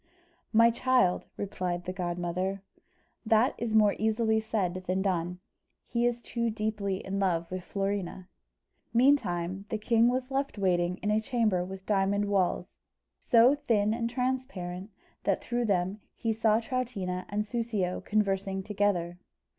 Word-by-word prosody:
"My 230 +1 +6
child," 245 -6 +2
replied 180 -3 -3
the 185 - -4
godmother, 180 +2 -2 0.6
"that 225 +3 +3
is 225 -1 -1
more 210 -2 +5
easily 220 0 +2
said 185 -5 -2
than 185 +1 0
done; 180 -2 -1 0.5
he 235 0 0
is 240 0 -2
too 235 -1 -1
deeply 210 -3 -2
in 195 +1 -2
love 170 -3 0
with 185 -1 -4
Florina." 195 -2 -3 0.7
Meantime 195 -8 +2
the 220 - -1
king 230 +2 +3
was 255 +2 -1
left 275 -3 -1
waiting 180 -2 +1
in 210 - +1
a 215 +1 +2
chamber 220 -7 +1
with 190 +1 -8
diamond 200 0 +1
walls, 185 -2 0 0.4
so 240 +1 +5
thin 225 -8 +1
and 230 0 -1
transparent, 235 -8 -3 0.3
that - - +1
through 240 0 -1
them 195 0 0
he 225 -1 -1
saw 220 0 +3
Troutina 220 -7 -3
and 210 +1 0
Soussio 215 -6 -2
conversing 195 -2 0
together. 190 -4 0
205 Hz, 140 wpm, -29 LUFS, 185-230 Hz, 0.7 s, My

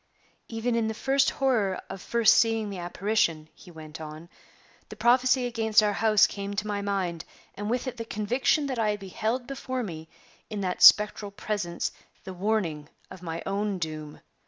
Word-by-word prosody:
"Even 230 +1 -2
in 230 -1 +1
the 220 - -3
first 275 +3 +2
horror 220 -9 0
of 190 - -8
first 235 +2 +4
seeing 225 -2 +2
the 190 - -6
apparition," 175 -3 -1
he - - -16
went 160 -1 -10
on, 155 +2 -9 0.6
"the - - -9
prophecy 250 +1 +3
against 225 -2 +3
our 210 -1 +1
house 215 0 +4
came 200 0 -5
to 210 - -2
my 205 -1 -2
mind, 190 -5 -2 0.3
and 205 +1 -5
with 245 +2 -1
it 255 -1 -5
the 230 - -5
conviction 245 +8 0
that 260 -4 -3
I 210 -2 +1
beheld 220 +5 -3
before 260 -1 -4
me, 160 -5 -7 0.4
in 210 -2 -4
that 185 -2 -3
spectral 210 0 +6
presence, 200 -4 -3 0.3
the 190 - -7
warning 180 -6 -1 0.2
of 185 -1 -10
my 165 -1 -5
own 200 0 -1
doom. 155 -3 -6
210 Hz, 175 wpm, -27 LUFS, 180-230 Hz, 0.6 s, spectral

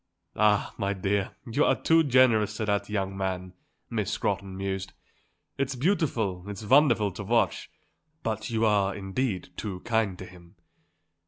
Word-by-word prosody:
"Ah, 105 -1 +2
my 100 0 0
dear, 100 0 -1
you 120 +6 +1
are - - +2
too 165 0 +4
generous 120 -6 +3
to 110 - -1
that 100 0 0
young 95 -2 -2
man," 95 -1 -3 0.3
Miss - - -2
Scrotton 95 -1 -2
mused. 95 0 -3 0.7
"It's 135 0 -1
beautiful, 125 - 0
it's 105 +1 -6
wonderful 120 -5 +4
to 100 - -7
watch; 115 +3 +1 0.5
but 110 -2 -2
you 115 -1 +1
are, 100 -2 +2
indeed, 100 0 -2
too 95 -4 -5
kind 110 -5 0
to 95 - -8
him." 90 -2 -16
105 Hz, 150 wpm, -27 LUFS, 95-115 Hz, 0.7 s, too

